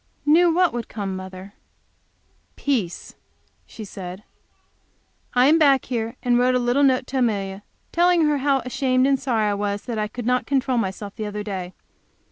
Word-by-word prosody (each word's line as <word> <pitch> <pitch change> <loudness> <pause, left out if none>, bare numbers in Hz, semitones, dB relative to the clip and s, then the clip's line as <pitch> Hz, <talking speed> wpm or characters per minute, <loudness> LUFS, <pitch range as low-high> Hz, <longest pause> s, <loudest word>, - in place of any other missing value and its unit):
"Knew 335 +4 +5
what 355 +1 +2
would 240 -2 -4
come, 200 -3 -4
mother?" 185 +1 -9 1.0
"Peace," 225 -12 -2 0.5
she 220 - -9
said. 185 0 -8 1.1
I 250 +1 +5
came 320 +3 +5
back 275 -4 +4
here 230 -1 -3
and 245 -1 +3
wrote 255 +1 +3
a - - +4
little 245 +3 +1
note 260 -2 +3
to 265 +1 -3
Amelia, 200 -5 -1 0.3
telling 345 -1 +3
her 295 -1 +1
how 275 -1 +2
ashamed 255 0 +1
and 275 -1 +2
sorry 220 -6 0
I - - 0
was 205 0 -2
that 235 -3 -4
I 210 - -1
could 240 +2 -7
not 250 +1 +1
control 265 -3 +1
myself 200 0 -4
the 215 -2 -4
other 210 0 -5
day. 190 -3 -5
245 Hz, 175 wpm, -23 LUFS, 205-270 Hz, 1.1 s, Knew